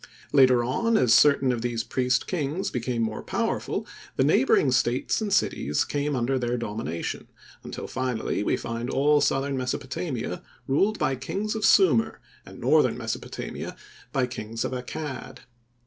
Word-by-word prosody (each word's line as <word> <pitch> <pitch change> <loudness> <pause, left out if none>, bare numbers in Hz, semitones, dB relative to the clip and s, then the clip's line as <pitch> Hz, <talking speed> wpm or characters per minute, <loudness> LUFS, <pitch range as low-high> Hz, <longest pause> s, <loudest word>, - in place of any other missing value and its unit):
Later 130 -3 +5
on 225 - +1
as 120 -3 +4
certain 140 -2 +5
of 120 -2 -2
these 120 -1 -2
priest 125 0 0
kings 165 +1 -2
became 120 -1 -1
more 110 -1 -3
powerful, - - -2 0.3
the - - +2
neighboring 135 -1 +4
states 125 - +1
and 210 -2 -2
cities 75 - +1
came 145 0 -1
under 130 +2 0
their 120 0 -1
domination, 105 -8 -4 0.4
until - - -6
finally 130 -5 -2
we - - +1
find 115 +1 -4
all 145 +2 +3
southern 140 0 +1
Mesopotamia 130 +2 -3 0.2
ruled 195 +11 +2
by 130 - 0
kings 195 +11 -3
of 220 -1 -4
Sumir, 230 - +4 0.3
and - - -11
northern - - +3
Mesopotamia - - -5 0.4
by 135 -4 +1
kings 115 -2 -5
of - - -3
Accad. 130 +3 -6
130 Hz, 150 wpm, -26 LUFS, 120-145 Hz, 0.4 s, Later